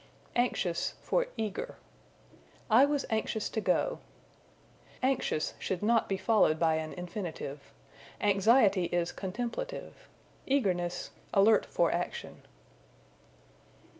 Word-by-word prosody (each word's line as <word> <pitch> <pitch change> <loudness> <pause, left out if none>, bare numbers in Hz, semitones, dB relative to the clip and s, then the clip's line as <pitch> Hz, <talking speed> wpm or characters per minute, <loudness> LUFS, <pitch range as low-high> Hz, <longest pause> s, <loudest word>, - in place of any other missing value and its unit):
Anxious 200 -8 0
for - - +1
Eager. 215 -3 -3 1.0
"I 245 +6 +8
was 285 -1 0
anxious 220 0 -1
to 220 - -2
go." 205 - +1 1.0
Anxious 255 - 0
should 190 0 -3
not 230 +1 +3
be 195 - 0
followed 205 -7 +3
by 160 -1 +2
an 155 0 -4
infinitive. 175 -6 -6 0.5
Anxiety 200 -1 +4
is 175 0 -1
contemplative; 245 - -5 0.4
eagerness, 180 -10 0 0.2
alert 205 +2 +5
for 170 - +2
action. 175 +1 -4
200 Hz, 100 wpm, -30 LUFS, 175-235 Hz, 1.0 s, I